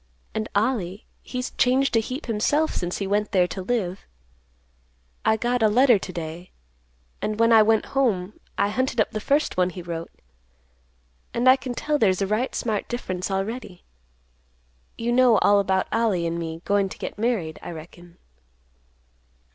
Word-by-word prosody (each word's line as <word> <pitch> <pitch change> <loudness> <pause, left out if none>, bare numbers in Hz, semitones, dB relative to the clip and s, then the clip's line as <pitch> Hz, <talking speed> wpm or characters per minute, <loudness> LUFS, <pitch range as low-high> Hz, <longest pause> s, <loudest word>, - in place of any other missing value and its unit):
"And 215 0 -3
Ollie 205 -3 0 0.2
he's 250 0 -5
changed 260 0 +3
a - - +6
heap 255 +7 -5
himself 290 +8 +1
since 175 0 -3
he 200 - -3
went 205 +2 0
there 185 -2 +4
to 190 +2 -5
live. 190 -3 -2 1.2
I 220 - +3
got 245 +2 0
a 220 - +5
letter 240 0 +5
to 185 - -7
day, 170 +1 -7 0.7
and, 215 0 -2
when 230 0 +5
I 220 - +8
went 220 0 +3
home, 215 -8 +1 0.2
I 200 - +2
hunted 255 +2 -1
up 215 - +2
the 215 - -3
first 285 +4 0
one 180 0 +3
he 180 0 -8
wrote, 170 -1 -5 1.3
and 240 +2 +1
I 255 - +9
can 260 -2 -6
tell 300 +3 0
there's 190 -5 +3
a 195 - +1
right 215 +6 -1
smart 220 -4 -2
difference 185 -7 -4
already. 195 0 -4 1.1
You 235 +1 -1
know 245 -2 +5
all 205 +1 +4
about 190 -1 +1
Ollie 215 -7 +1
and 170 0 -2
me 165 0 -5
goin' 200 -1 +2
to - - -9
get - - -6
married, 210 -9 -1
I - - -7
reckon?" 170 +1 -11
210 Hz, 170 wpm, -24 LUFS, 185-240 Hz, 1.3 s, I